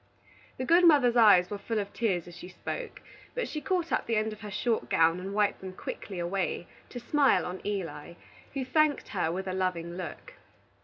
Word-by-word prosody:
The 260 - -3
good 340 +5 +5
mother's 280 -8 +6
eyes 205 -6 +6
were 205 - -4
full 225 +2 -3
of 200 -1 -3
tears 195 -7 -1
as 175 - -11
she 180 - -9
spoke, 475 - -6 0.3
but - - -1
she 305 - -5
caught 355 -2 -1
up - - 0
the 230 - +1
end 215 0 0
of 215 - -13
her 210 - -7
short 225 +3 -1
gown 165 +2 +3
and 190 +2 -5
wiped 210 -1 +1
them 190 -1 -7
quickly 190 +1 -7
away 175 0 -2 0.2
to 245 - -7
smile 275 +3 +3
on 180 +1 -5
Eli, 175 -5 -4 0.4
who 265 -2 -2
thanked 305 +1 +2
her 175 -5 -1
with 190 +2 -3
a 185 - -2
loving 180 -2 -2
look. 185 - -7
205 Hz, 205 wpm, -29 LUFS, 180-250 Hz, 0.4 s, mother's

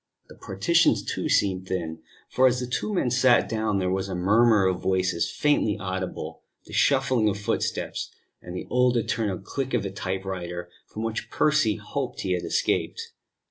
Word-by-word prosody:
The - - -13
partitions, - - +2
too, - - -3
seemed 95 -2 +1
thin; 85 -4 -3 0.3
for 130 +1 +4
as 125 0 +1
the 125 - -2
two 125 - -2
men 175 -11 0
sat 130 -1 +4
down 110 -2 0
there 95 -1 0
was 95 +1 -1
a 95 - -3
murmur 105 +3 +4
of 95 -1 0
voices 95 -2 0
faintly 145 -8 +1
audible, 95 -1 -5 0.2
the - - -13
shuffling 130 -5 +3
of 100 - -2
footsteps, 100 - -2 0.3
and 90 0 -8
the - - -5
old 125 -1 +3
eternal 110 -4 -1
click 135 +8 -3
of - - 0
the 100 - -4
typewriter 95 -2 -4 0.2
from 110 - -6
which 115 0 -3
Percy 150 -9 +2
hoped 130 +5 -4
he 95 - -2
had 90 -1 0
escaped. - - -1
105 Hz, 175 wpm, -25 LUFS, 95-125 Hz, 0.3 s, for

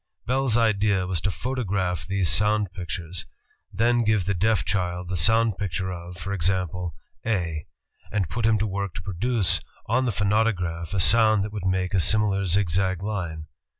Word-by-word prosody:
Bell's 130 -2 +2
idea 105 -4 +2
was 90 -3 -2
to 100 - 0
photograph 95 - -2
these 95 -2 0
sound 105 +2 +2
pictures; 90 -2 -5 0.4
then 120 +3 +2
give 110 -4 +2
the 100 - +1
deaf 100 -2 +1
child 90 -2 -2
the 95 - -1
sound 110 +3 +3
picture 95 -1 -2
of, 85 0 -8
for 100 +3 -4
example, 90 -2 -1 0.3
"A," 85 -8 -2 0.4
and 100 -5 0
put 115 +5 -1
him 110 -1 +4
to 105 - 0
work 100 -3 -3
to 85 - -6
produce 100 +3 0 0.2
on 130 +4 +1
the 120 - +1
phonautograph 100 -5 0
a - - +1
sound 110 +1 +5
that 105 +1 -5
would 100 -3 -3
make 95 0 0
a 95 - +3
similar 100 0 +2
zigzag 95 0 +1
line. 85 -7 -3
95 Hz, 170 wpm, -25 LUFS, 90-110 Hz, 0.4 s, sound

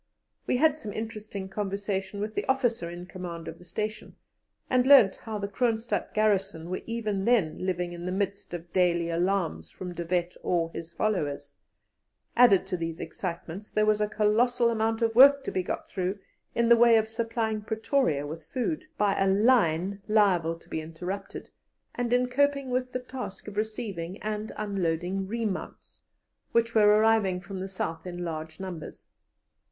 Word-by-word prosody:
We - - +2
had 310 +2 +3
some 215 -7 -6
interesting 215 -3 -5
conversation 200 0 -3
with 215 +1 -3
the - - -3
officer 245 -9 +1
in 175 +1 -7
command 175 -3 -7
of 165 - -7
the - - -14
station, 215 +4 -5 0.5
and 255 0 +2
learnt 265 -9 +7
how 220 -2 -5
the 200 -1 -3
Kroonstadt 230 +2 -1
garrison 195 -5 +1
were 185 - -2
even 215 -4 -2
then 190 -10 +2
living 180 -1 -1
in 175 +1 -6
the - - -1
midst 200 +1 -2
of 170 0 -9
daily 170 -2 +2
alarms 175 - 0
from 180 -1 -7
De 175 - -4
Wet 175 +1 -1
or 165 -2 0
his 165 0 -7
followers; 145 -9 -2 0.8
added 225 -7 +6
to 190 -1 -3
these 165 -1 -4
excitements, 175 +3 -6
there 215 - +2
was 215 0 +3
a 210 - +2
colossal 235 +3 +2
amount 225 0 0
of 225 0 +2
work 275 +3 +8
to - - -3
be 185 - 0
got - - -4
through 185 +2 -2 0.4
in 235 0 +2
the 235 - +8
way 235 0 +6
of 220 0 +1
supplying 225 -1 -2
Pretoria 220 - 0
with 160 +2 -8
food, 275 +4 -2
by 205 -2 +2
a 195 - +3
line 195 -3 +3
liable 185 -6 +3
to - - -22
be 160 - -3
interrupted, 175 +5 -6 0.4
and 240 -1 -2
in 250 0 +3
coping 280 0 +1
with 255 0 -1
the 255 - -2
task 250 -6 -7
of 205 - -7
receiving 205 -4 -3
and 215 0 -3
unloading 190 -2 -1
remounts, 220 -3 -4 0.5
which 230 0 +2
were 215 -2 +5
arriving 210 -3 +4
from 190 +1 -7
the 190 - -4
South 165 -3 -4
in 175 0 -5
large 160 0 -5
numbers. 185 -4 -7
200 Hz, 170 wpm, -28 LUFS, 175-225 Hz, 0.8 s, work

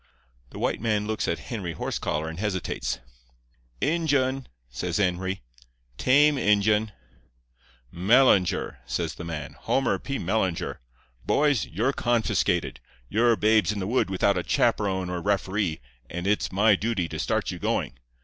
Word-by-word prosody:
"The - - -11
white - - -1
man 105 -2 0
looks 110 0 -2
at 85 - 0 0.2
Henry 95 -7 -3
Horsecollar 75 +1 -2
and 80 +2 -6
hesitates. 95 - -2 0.8
"'Injun,' 140 -5 +1 0.2
says 85 +8 -3
Henry; 95 -4 -1 0.6
'tame 145 +2 +4
Injun.' 105 0 +3 1.0
"'Mellinger,' 95 - +3
says 60 - -2
the - - -8
man—'Homer 80 - -1
P. 140 0 -4
Mellinger. 95 -2 -1 0.5
Boys, 145 - +2
you're 110 - 0
confiscated. 120 -3 0 0.3
You're 115 +1 +3
babes 110 0 +3
in 105 - -4
the 95 - -2
wood 115 0 +1
without 95 0 +2
a - - -3
chaperon 95 -1 +1
or 90 -1 -3
referee, 100 -3 0 0.3
and 90 +1 -5
it's 105 +1 +1
my 105 +3 +4
duty 100 -4 -1
to - - -6
start - - 0
you - - -7
going. 60 - -2
100 Hz, 135 wpm, -26 LUFS, 90-115 Hz, 1.0 s, tame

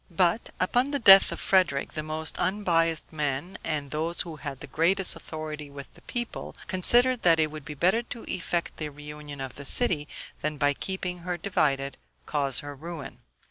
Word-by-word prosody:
But, 180 +4 +1
upon 245 +8 +2
the 285 - 0
death 195 -6 +9
of - - -4
Frederick, 180 -8 +2
the 155 - -2
most 155 0 -4
unbiased 165 -5 +1
men, 150 +3 -2
and 145 -3 -2
those 160 +3 -1
who 165 -3 -6
had 140 -2 -6
the - - -4
greatest 185 +4 +2
authority 155 -2 -7
with 140 -1 -10
the - - -19
people, 240 -1 -5
considered 240 +7 +3
that 165 -2 +5
it 155 -1 +2
would 155 -2 -9
be 150 -2 -7
better 185 +10 +3
to 235 0 -8
effect 175 -1 -2
the 155 -1 -4
reunion 150 0 -9
of 135 -2 -6
the 140 - -7
city, 150 - +2 0.3
than, 150 0 -2
by 145 0 +3
keeping 180 +2 -4
her 175 0 -3
divided, 140 -7 0 0.3
cause 140 -3 +1
her 145 0 -7
ruin. 145 -4 -8
160 Hz, 180 wpm, -27 LUFS, 145-185 Hz, 0.3 s, death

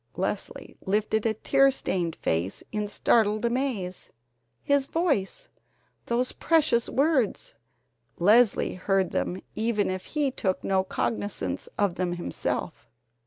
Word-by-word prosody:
Leslie - - -4
lifted 215 +2 +1
a 220 - 0
tear 275 +5 +4
stained 180 -10 -2
face 85 +4 -2
in 210 -1 -2
startled 215 +1 +2
amaze. 235 -7 -2 0.5
His 280 -1 +2
voice! 330 - -1 0.6
Those 245 +2 +1
precious 305 -8 +2
words! 275 -6 +1 0.6
Leslie 215 +4 +4
heard 190 0 0
them 185 - -2
even 215 -3 0
if 185 0 -5
he 295 -3 -1
took 190 -7 -2
no 190 -1 +2
cognizance 105 - -3
of 200 -4 +1
them 180 -1 -1
himself. 175 0 -4
210 Hz, 120 wpm, -27 LUFS, 185-255 Hz, 0.6 s, tear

